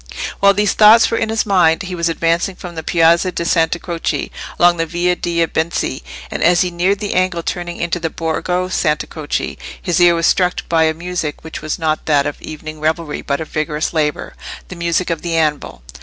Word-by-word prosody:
While 200 0 +5
these 205 0 +2
thoughts 220 +2 +6
were 230 - +1
in - - -1
his 225 0 0
mind 180 -5 +3
he 185 0 -6
was 170 -1 0
advancing 170 +3 0
from 180 -1 -9
the 160 - -5
Piazza 170 +3 +3
di 170 - -3
Santa 165 0 +2
Croce 170 -1 -3 0.3
along 175 0 +4
the 165 0 -1
Via 175 +2 0
dei 170 -1 0
Benci, 160 -4 -2 0.3
and - - -2
as 175 +1 +4
he 180 - 0
neared 180 +4 +1
the 205 0 -3
angle 185 -2 0
turning 175 -1 -4
into 170 +1 -2
the 165 -1 -2
Borgo 180 +3 -2
Santa 155 -4 0
Croce 155 -2 -4 0.2
his 175 -2 0
ear 175 -1 +6
was 165 0 0
struck 180 -1 +1
by 165 -1 +3
a 160 0 +1
music 170 -3 -4
which 160 - -7
was 155 0 -3
not 155 -2 -1
that 145 -2 +3
of 145 - -4
evening 155 0 -8
revelry, 155 0 -2
but 140 -1 -2
of 160 - -6
vigorous 155 +1 -2
labour—the 155 +3 -4
music 170 +1 -1
of 165 - -2
the 170 -1 -2
anvil. 150 - -1
170 Hz, 205 wpm, -17 LUFS, 160-180 Hz, 0.3 s, thoughts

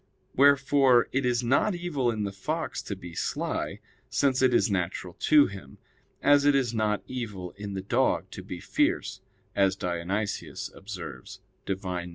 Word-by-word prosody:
Wherefore 135 -3 +5
it 135 -1 +1
is 120 0 +1
not 140 - +2
evil 160 -8 -1
in 110 -2 -1
the 100 - -2
fox 155 +12 -3
to 100 - -5
be 90 -3 -10
sly, - - -3 0.3
since 135 -2 +2
it 130 -1 +5
is 120 -3 +3
natural 90 -1 -2
to 150 -2 +6
him; 95 -9 -9 0.5
as 145 0 +5
it 145 0 +4
is 125 -4 +1
not 105 -2 0
evil 105 -8 -5
in 100 -1 -7
the 95 - -4
dog 95 - +1
to - - -7
be - - -7
fierce, - - 0 0.3
as 95 -1 +3
Dionysius 95 +3 -3
observes 90 - -8 0.3
(De 95 - +1
Div. 90 -2 -4
105 Hz, 165 wpm, -27 LUFS, 95-135 Hz, 0.5 s, to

